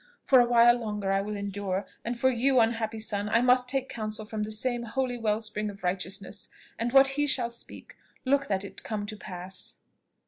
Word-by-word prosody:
For 260 - +6
a 245 - +6
while 240 0 +6
longer 210 -3 -2
I 195 0 +2
will 210 +1 -4
endure; 200 -1 -3 0.2
and 235 0 -3
for 260 +1 +4
you, 255 +2 +3
unhappy 225 -1 +1
son, 210 -1 -2
I 230 +2 +3
must 250 0 +4
take 265 0 -1
counsel 215 -2 -5
from 215 0 -4
the 210 - -2
same 240 +3 -1
holy 245 +2 -2
well 220 -2 0
spring 210 -1 -3
of 200 -1 -11
righteousness, 190 +2 -3 0.3
and 235 +1 -1
what 270 +1 +7
he 290 +2 0
shall 245 -4 0
speak, 235 - -10 0.3
look 275 +1 +2
that 195 0 -1
it - - -10
come 210 -2 -4
to 215 +1 -6
pass." 185 -2 -7
220 Hz, 205 wpm, -28 LUFS, 205-245 Hz, 0.3 s, what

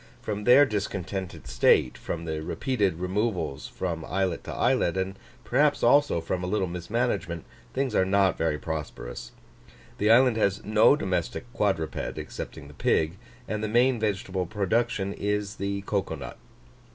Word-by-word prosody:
From 105 -1 -4
their 130 +4 +8
discontented 95 -4 -4
state, 60 +1 +3
from 85 0 -5
the 80 -1 -3
repeated 105 - 0
removals 90 -4 -2
from 85 -3 -4
islet 95 -2 -1
to - - -5
islet, 85 +2 +1
and 95 0 -1 0.3
perhaps 145 0 +2
also 145 -10 +4
from 90 +2 -3
a - - -2
little 100 0 +1
mismanagement, 90 -1 -2 0.3
things 135 -3 0
are 95 - +4
not 95 0 +3
very 80 -2 0
prosperous. 75 -6 -6 0.7
The 105 - +2
island 120 0 +6
has 100 -2 +1
no 110 +6 +5
domestic 90 - -2
quadruped, 95 - -1
excepting 75 -3 -7
the 75 - -13
pig, 80 +5 +1 0.3
and 110 0 -3
the - - 0
main 120 +3 +3
vegetable 95 -4 -1
production 100 +1 0
is 105 +1 -2
the 100 0 -2
cocoa 100 -1 -1
nut. - - -8
95 Hz, 150 wpm, -27 LUFS, 85-110 Hz, 0.7 s, their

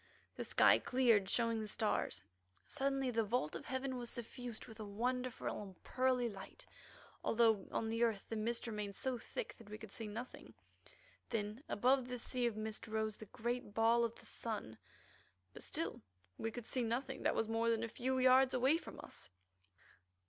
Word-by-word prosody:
The - - -3
sky - - +6
cleared, 230 -7 +4
showing 230 -1 +2
the 215 - -4
stars; - - 0 0.4
suddenly 270 -1 0
the 225 -1 +2
vault 205 -7 0
of - - -6
heaven 260 0 -1
was 240 -1 -3
suffused 240 -1 -5
with 220 0 -12
a - - -3
wonderful 245 +5 -2
and 190 -3 -10
pearly 255 -1 +2
light, 195 -4 -8 0.6
although 225 -4 +4
on 225 - 0
the 225 +1 -1
earth 220 -4 +1
the 225 - -3
mist 230 +2 0
remained 210 -3 -3
so 260 0 -1
thick 425 - -5
that 225 -3 -13
we 210 - -6
could 220 -2 -10
see 225 +1 -4
nothing. 230 +5 -7 0.7
Then 210 +2 -2
above 255 +3 +3
this 250 -1 -4
sea 250 -1 +1
of 220 -2 -2
mist 215 +1 -4
rose 220 -1 0
the 215 - -10
great 235 -1 -3
ball 230 +1 +5
of 230 -1 -1
the - - -16
sun, 210 - -4 0.8
but - - -9
still - - -1 0.4
we 225 - 0
could 235 0 -6
see 255 - 0
nothing 250 +3 -1
that - - +2
was 225 - +1
more 225 +1 +2
than 230 0 +2
a - - 0
few 260 +3 -1
yards 255 +1 +6
away 260 +5 +4
from - - -9
us. - - -9
230 Hz, 185 wpm, -38 LUFS, 220-250 Hz, 0.8 s, sky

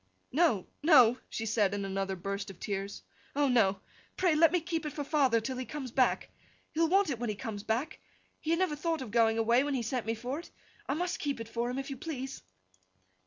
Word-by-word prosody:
'No, 285 - +3 0.2
no!' 255 -6 +6
she 225 - -3
said, 210 -3 +2
in 200 -1 -3
another 195 0 -2
burst 195 +2 -4
of 195 - -11
tears. 200 0 -4 0.3
'Oh, 290 0 +3
no! 205 -7 +3 0.4
Pray 360 -3 +3
let 310 0 +5
me 360 - +3
keep 330 -1 -3
it 300 - -4
for 290 - -3
father 275 -5 +3
till 255 +3 -4
he 255 - -2
comes 275 -4 -6
back! 255 0 +2 0.4
He 315 - -4
will 330 - +5
want 385 -3 +3
it 240 - -3
when 240 -2 -2
he 210 - -2
comes 215 -2 -5
back. 245 +9 -2 0.4
He 315 - -5
had 335 - +3
never 365 -4 +1
thought 325 -1 -1
of 230 - -9
going 225 -1 +3
away, 235 +3 +4
when 285 -1 -1
he 245 - -1
sent 235 0 -2
me 225 - 0
for 250 +6 -4
it. 345 - -11 0.4
I 275 - +1
must 355 +2 -2
keep 280 -4 -2
it 230 - -6
for 235 +1 -1
him, 250 - -3
if 270 +1 -4
you 270 - -5
please! 270 -2 -5
255 Hz, 235 wpm, -31 LUFS, 220-300 Hz, 0.4 s, no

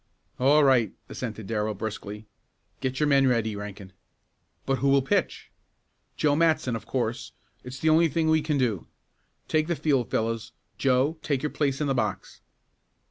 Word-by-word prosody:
"All 145 +4 +5
right," 125 -7 +3 0.2
assented 110 -4 -6
Darrell 105 0 -2
briskly. 105 0 -6 0.5
"Get 130 0 -2
your 150 - +3
men 140 -2 +4
ready, 115 -4 +1
Rankin." 100 -2 -8 0.7
"But 135 -1 0
who 140 - +2
will 135 -1 +4
pitch?" 135 - -1 0.7
"Joe 145 -1 +2
Matson, 160 -6 +2
of 115 - -7
course. 120 -2 -3 0.3
It's 125 +1 -8
the 160 - +1
only 165 +2 +5
thing 160 +2 0
we 160 0 +3
can 150 -1 -1
do. 115 -9 -1 0.6
Take 155 0 +1
the 170 - 0
field, 135 -7 0
fellows. 115 +1 -2 0.3
Joe, 135 +4 +2
take 140 -3 -1
your 150 - -1
place 140 -3 -1
in - - +1
the 135 - +1
box!" 125 - -3
130 Hz, 165 wpm, -26 LUFS, 115-150 Hz, 0.7 s, All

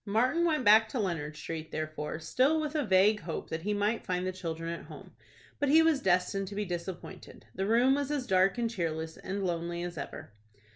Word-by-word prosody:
Martin 245 +11 +1
went 305 -6 +1
back 215 +1 +7
to 255 - -4
Leonard 160 -7 -2
Street, 160 0 -6
therefore, 155 -1 -4
still 260 - +2
with 305 -1 -3
a 305 -2 0
vague 210 0 +4
hope 165 -3 -6
that 160 - -3
he 205 +5 -2
might 210 +2 0
find 180 -1 -2
the 185 - -1
children 165 -3 -5
at 170 - -8
home. - - -12 0.5
But 290 -1 +1
he 320 +3 +7
was 320 -4 +3
destined 190 +1 +1
to 200 - -7
be 210 0 -1
disappointed. 175 0 -7
The 190 +1 -2
room 240 +4 +4
was 285 0 -1
as 290 -4 -1
dark 190 +1 +3
and 235 -1 +1
cheerless 160 -7 -3
and 195 +1 -4
lonely 170 0 -2
as 175 -3 -5
ever. 140 - -7
195 Hz, 210 wpm, -30 LUFS, 170-235 Hz, 0.5 s, back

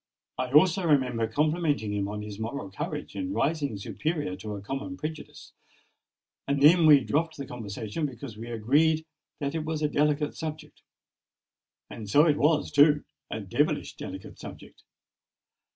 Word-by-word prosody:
I 130 0 -2
also 180 +6 +5
remember 130 -8 +2
complimenting 150 -3 0
him 100 -1 -1
on 105 +1 -5
his 105 -1 -8
moral 110 -3 -4
courage 145 +9 -5
in 285 0 -3
rising 145 -7 0
superior 150 - -3
to 105 +2 -6
a 100 - -7
common 135 +4 -5
prejudice; 155 +1 -7 0.9
and 140 0 +1
then 160 +3 +7
we 145 -3 +8
dropped 160 +5 -1
the 140 - -5
conversation 110 +4 -4
because 125 -3 -9
we 115 +2 -8
agreed 150 +8 +2 0.3
that 140 -2 -2
it 160 -1 -2
was 155 -1 -3
a - - +4
delicate 150 0 +1
subject. 155 -1 -7 1.1
And 105 -3 -8
so 145 +9 +6
it 150 -3 +3
was, 150 +1 +2
too: 150 0 +5 0.3
a - - -4
devilish - - 0
delicate - - -8
subject! - - -11
145 Hz, 150 wpm, -27 LUFS, 115-155 Hz, 1.1 s, we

